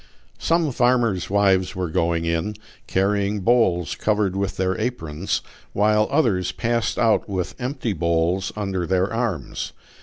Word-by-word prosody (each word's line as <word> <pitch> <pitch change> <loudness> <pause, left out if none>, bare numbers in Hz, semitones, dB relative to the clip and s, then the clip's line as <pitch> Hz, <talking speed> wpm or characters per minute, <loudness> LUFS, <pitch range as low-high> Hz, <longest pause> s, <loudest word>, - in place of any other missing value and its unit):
Some 165 -3 +1
farmers' 120 -7 +2
wives 95 -2 +2
were 90 -3 -2
going 85 +1 +1
in, 85 +5 -1 0.3
carrying 100 +1 +1
bowls 95 -7 +2
covered 105 -3 0
with 100 0 -2
their 95 0 0
aprons, 95 -8 -2 0.3
while 105 +1 +3
others 110 - +1
passed 115 0 -1
out 115 -3 +2
with 95 -3 -2
empty 125 -3 -2
bowls 85 +2 0
under 95 -4 -2
their 95 +3 +1
arms. 115 - -3
100 Hz, 130 wpm, -23 LUFS, 90-115 Hz, 0.3 s, while